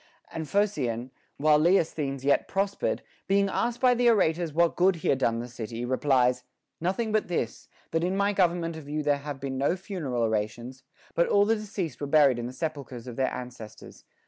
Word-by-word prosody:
And 160 -1 -5
Phocion, 130 - 0 0.3
while 150 +1 +4
Leosthenes 155 -5 +1
yet 140 - +3
prospered, 195 +1 -1 0.2
being 200 0 +3
asked 235 +4 -1
by 250 -1 +5
the 245 0 +3
orators 170 -6 +2
what 170 +2 +2
good 185 +1 +4
he 160 - -3
had 135 - +2
done 115 -3 +1
the 120 +1 -4
city, 115 0 -6
replies: 125 -1 +2 0.4
Nothing 195 +6 -1
but 215 0 +1
this, 140 -10 -3 0.2
that 165 +1 0
in 185 +2 0
my 200 +1 +2
government 170 -3 +1
of 150 -3 -9
you 150 +1 -2
there, 145 -1 +2
have 140 -1 -6
been 135 -1 -4
no 140 +6 +2
funeral 170 - -3
orations, 115 +4 -2 0.3
but 170 - +2
all 205 0 +4
the 225 +2 +3
deceased 195 - -5
were 145 - -2
buried 140 -4 +4
in 120 - -3
the - - -6
sepulchres 135 -4 -5
of 125 -2 -7
their 130 0 0
ancestors. 125 -4 -9
150 Hz, 195 wpm, -27 LUFS, 125-185 Hz, 0.4 s, by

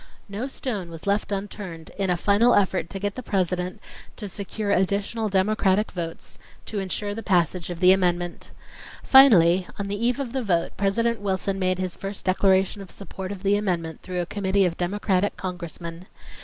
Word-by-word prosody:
No 210 +6 -4
stone 215 -10 -4
was 165 -1 -9
left 200 +1 0
unturned 195 -5 -5
in 195 -2 -1
a 180 - +2
final 210 +7 +4
effort 190 -4 +1
to 195 - -4
get 205 +1 -2
the 255 - -6
President 185 -2 -1 0.4
to 210 - -6
secure 200 +1 -4
additional 200 +4 0
Democratic 195 +1 +2
votes 165 -2 -7 0.3
to 210 - -3
insure 205 +2 -2
the 225 - -5
passage 180 -3 +1
of 175 -1 -5
the 185 0 +7
amendment. 175 -2 0 0.5
Finally, 185 -10 +7
on 200 -1 -4
the 205 +3 -3
eve 245 +2 +2
of 260 -4 -4
the 265 - 0
vote 175 -7 0
President 225 +3 +1
Wilson 195 0 -1
made 185 -1 +1
his 185 -1 -3
first 195 -1 -6
declaration 190 +1 +2
of 190 - -10
support 190 -1 -8
of 200 -1 -7
the 200 +1 +3
amendment 175 -6 -2
through 180 -1 -3
a - - -2
committee 195 +1 +1
of 170 -2 -1
Democratic 190 +2 0
Congressmen. 170 -1 -6
195 Hz, 180 wpm, -24 LUFS, 180-205 Hz, 0.5 s, the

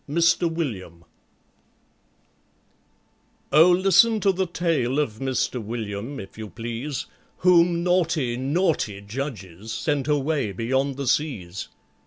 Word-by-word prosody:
MISTER 170 +3 +3
WILLIAM 105 - -5 2.5
OH, 160 +5 +7
listen 195 +5 +5
to 195 - +4
the 190 0 -1
tale 165 -7 0
of 120 -7 -1
MISTER 130 -2 -1
WILLIAM, 110 +3 -5
if 95 +2 -10
you 110 -1 -6
please, 120 - -5 0.3
Whom 175 -1 +4
naughty, 165 -8 +1
naughty 135 - 0
judges 105 - -6
sent 145 +2 -1
away 145 -6 0
beyond 130 +6 -1
the 140 - -3
seas. 105 - -1
135 Hz, 110 wpm, -24 LUFS, 110-165 Hz, 2.5 s, OH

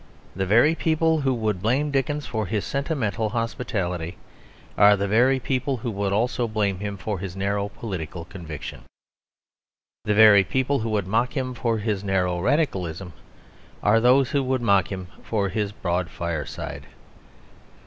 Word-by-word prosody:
The 95 0 -1
very 120 - +5
people 160 0 +1
who 135 -1 +1
would 110 -6 -1
blame 135 +8 +1
Dickens 145 +2 -1
for 110 -3 -3
his 105 +1 -2
sentimental 120 - -1
hospitality 95 -7 -3 0.6
are 105 0 +6
the 100 +1 -1
very 125 +6 +3
people 130 +1 -1
who 115 +1 -4
would 100 -1 -2
also 120 +3 0
blame 105 -4 -1
him 100 0 -4
for 95 +2 -4
his 95 -1 -6
narrow 100 +1 -1
political 90 -6 -6
conviction. 85 -5 -8 1.2
The 105 - +1
very 105 -2 +8
people 130 +5 0
who 115 0 -2
would 105 -3 0
mock 115 +6 0
him 130 -1 -2
for 115 -2 -1
his 105 -2 -2
narrow 90 -3 0
radicalism 95 - -1 0.7
are 105 +2 +4
those 125 +2 +4
who 140 - +2
would 130 -2 -1
mock 100 -3 +3
him 95 -1 -4 0.2
for 100 -3 -1
his 105 +1 -2
broad 90 -3 -2
fireside. 85 -2 -5
105 Hz, 155 wpm, -24 LUFS, 95-125 Hz, 1.2 s, very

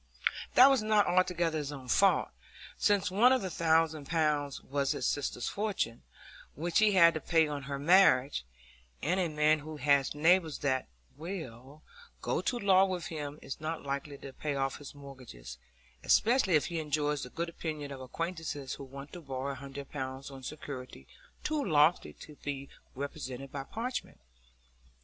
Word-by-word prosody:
That 260 +2 +9
was 265 -4 +3
not 215 -1 +3
altogether 175 -3 +1
his 145 -1 -4
own 135 -3 -9
fault, 195 +9 +3 0.5
since 205 -3 +2
one 230 +7 +5
of 260 -4 +2
the 185 - -3
thousand 160 -2 +2
pounds 150 -3 0
was 140 0 -1
his - - -3
sister's 135 -4 -1
fortune, 200 - -2 0.5
which 170 +4 +1
he 215 -1 +4
had 170 -3 +7
to 155 - -4
pay 165 -2 +3
on 145 -1 -4
her 140 - -2
marriage; 145 - +4 0.6
and 180 +4 +1
a 180 - +1
man 155 0 +3
who 155 +1 -8
has 140 0 +2
neighbours 165 +1 +3
that 130 - +1 0.3
will 150 -5 -8 0.4
go - - -1
to 245 - -1
law 195 -3 +5
with 180 -3 -3
him 150 -2 -5
is 135 - -7
not 160 +1 -4
likely 140 +1 -4
to 135 -1 -10
pay 145 0 -3
off 135 -1 -1
his 145 0 -11
mortgages, 125 - -11 0.4
especially 225 -5 +4
if 150 - +3
he 170 -2 -3
enjoys 150 -1 -1
the 125 - -6
good 170 +6 -3
opinion 155 -4 -5
of 135 -1 -7
acquaintances 155 -1 -4
who - - -8
want 140 +2 -10
to 175 - -8
borrow 135 -1 -4
a - - -5
hundred 140 +1 -9
pounds 135 0 -5
on 135 -1 -10
security 130 - -8 0.4
too 305 -1 0
lofty 155 - +3
to 150 -2 -13
be 140 -1 -5 0.3
represented 135 -1 -6
by 140 -1 -4
parchment. 235 - -5
150 Hz, 170 wpm, -31 LUFS, 140-175 Hz, 0.6 s, That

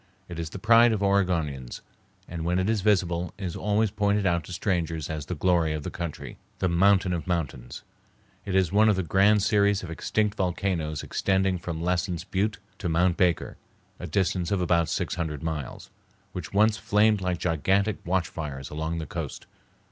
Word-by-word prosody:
It 85 - -7
is 80 -2 -3
the - - -7
pride 115 +3 +5
of 105 -2 -1
Oregonians, 85 -10 0 0.5
and 85 -2 -5
when 90 +2 0
it 95 +1 0
is 110 -2 +1
visible 90 -4 +1
is 95 -4 -4
always 105 0 +1
pointed 105 -1 +1
out 85 -2 +1
to - - -10
strangers 85 -5 -2
as 75 -2 -5
the 90 - -3
glory 85 -1 +2
of 75 -1 -4
the - - -5
country, 85 -4 -6 0.2
the 95 - 0
mountain 95 +1 +3
of 85 -2 -4
mountains. 70 -9 -3 0.6
It 95 - -3
is 95 -3 +3
one 110 +2 +5
of 105 - +3
the 95 - -1
grand 100 +4 +3
series 100 -2 +2
of 85 - -6
extinct 105 +5 -1
volcanoes 90 -5 -1
extending 95 -1 0
from 85 -1 -5
Lassen's 90 -1 -1
Butte 100 +2 -1 0.2
to 90 - -2
Mount 90 +2 +2
Baker, 90 -2 0 0.4
a - - -5
distance 90 -3 0
of 100 - 0
about 85 -2 +2
six - - -2
hundred 80 -3 -4
miles, 80 -5 -5 0.4
which 90 -3 -6
once 105 +2 +3
flamed 105 +1 +2
like 90 -1 -1
gigantic 95 +5 +1
watch 90 -1 0
fires 70 -4 -6
along 80 +2 -3
the 80 - -4
coast. - - -6
90 Hz, 185 wpm, -26 LUFS, 85-100 Hz, 0.6 s, pride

